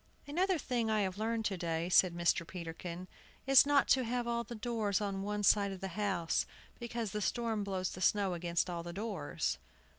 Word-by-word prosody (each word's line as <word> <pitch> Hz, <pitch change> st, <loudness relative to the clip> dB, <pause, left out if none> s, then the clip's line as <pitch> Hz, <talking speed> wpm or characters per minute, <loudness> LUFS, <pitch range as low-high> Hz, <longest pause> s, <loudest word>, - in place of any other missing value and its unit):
"Another 360 Hz, +5 st, +1 dB
thing 245 Hz, -6 st, -1 dB
I 215 Hz, -1 st, +2 dB
have 190 Hz, 0 st, -2 dB
learned 225 Hz, 0 st, -1 dB
to 195 Hz, -2 st, -1 dB
day," 165 Hz, -1 st, -2 dB
said 180 Hz, -1 st, +4 dB
Mr. 170 Hz, 0 st, +2 dB
Peterkin, 175 Hz, 0 st, -7 dB, 0.4 s
"is 270 Hz, +1 st, +7 dB
not 285 Hz, -1 st, +4 dB
to 260 Hz, -, +4 dB
have 240 Hz, +1 st, -1 dB
all 235 Hz, 0 st, -1 dB
the 235 Hz, -, -8 dB
doors 215 Hz, -4 st, -1 dB
on 200 Hz, -2 st, -2 dB
one 205 Hz, +1 st, -2 dB
side 200 Hz, 0 st, +4 dB
of 190 Hz, -, -7 dB
the 195 Hz, 0 st, -4 dB
house, 190 Hz, -3 st, -1 dB, 0.3 s
because 235 Hz, -3 st, -4 dB
the 210 Hz, -, -3 dB
storm 225 Hz, 0 st, -1 dB
blows 190 Hz, -2 st, -2 dB
the 185 Hz, -, -8 dB
snow 200 Hz, -2 st, +2 dB
against 170 Hz, -1 st, -1 dB
all 175 Hz, -1 st, -3 dB
the 170 Hz, 0 st, -7 dB
doors." 170 Hz, -, -3 dB
205 Hz, 200 wpm, -33 LUFS, 180-230 Hz, 0.4 s, is